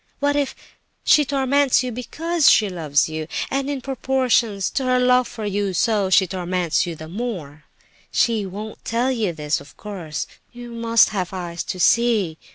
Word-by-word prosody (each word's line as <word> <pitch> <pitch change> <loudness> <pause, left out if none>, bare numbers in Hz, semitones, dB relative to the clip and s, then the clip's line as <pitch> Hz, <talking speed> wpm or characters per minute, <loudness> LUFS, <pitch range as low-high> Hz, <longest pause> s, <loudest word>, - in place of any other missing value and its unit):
And - - -43
what 285 0 +2
if 285 -2 -1 0.5
she 295 - +5
torments 275 -1 +2
you 250 - -3
because 310 +7 +1
she 210 -2 +4
loves 155 -6 +1
you, 155 0 -5 0.2
and 275 +1 -1
in 280 -2 -3
proportion 255 -5 +1
to 195 +8 -1
her 255 0 +2
love 250 0 +3
for 225 -3 -7
you, 200 -1 -1
so 205 0 +1
she 190 +1 +5
torments 180 -2 -1
you 170 - -4
the 155 0 -9
more? 170 -7 -6 0.5
She 225 -3 +2
won't 210 +3 -8
tell 240 +3 0
you 220 -7 0
this, 150 -2 -2
of 145 - -16
course; 180 -8 -5 0.3
you 240 0 -10
must 230 -1 +3
have 190 -3 -3
eyes 175 -2 -4
to 185 - -5
see. 215 -7 +2
220 Hz, 175 wpm, -22 LUFS, 180-250 Hz, 0.5 s, she